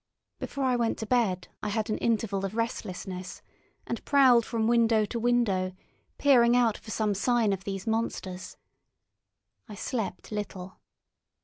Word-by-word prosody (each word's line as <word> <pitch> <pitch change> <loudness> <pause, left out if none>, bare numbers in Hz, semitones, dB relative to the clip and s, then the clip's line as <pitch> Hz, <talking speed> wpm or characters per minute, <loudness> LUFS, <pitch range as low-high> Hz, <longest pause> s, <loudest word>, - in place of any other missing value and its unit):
Before 280 - -4
I 255 -1 +2
went 235 -2 0
to 220 - -4
bed 210 -7 +1
I 210 - -2
had 215 +1 -1
an - - -1
interval 215 -4 0
of 195 +2 -3
restlessness, 190 -5 -4 0.4
and 235 - -4
prowled 255 -5 +5
from 225 -2 -1
window 230 -2 +3
to 235 +3 -4
window, 220 -6 +1 0.4
peering 245 -4 +5
out 235 -3 +3
for 220 - -12
some 215 -1 0
sign 225 +1 +2
of 195 0 -5
these 195 0 -4
monsters. 220 -5 -3 1.1
I 210 - -7
slept 225 +1 -4
little. 190 -3 -6
220 Hz, 145 wpm, -28 LUFS, 195-235 Hz, 1.1 s, prowled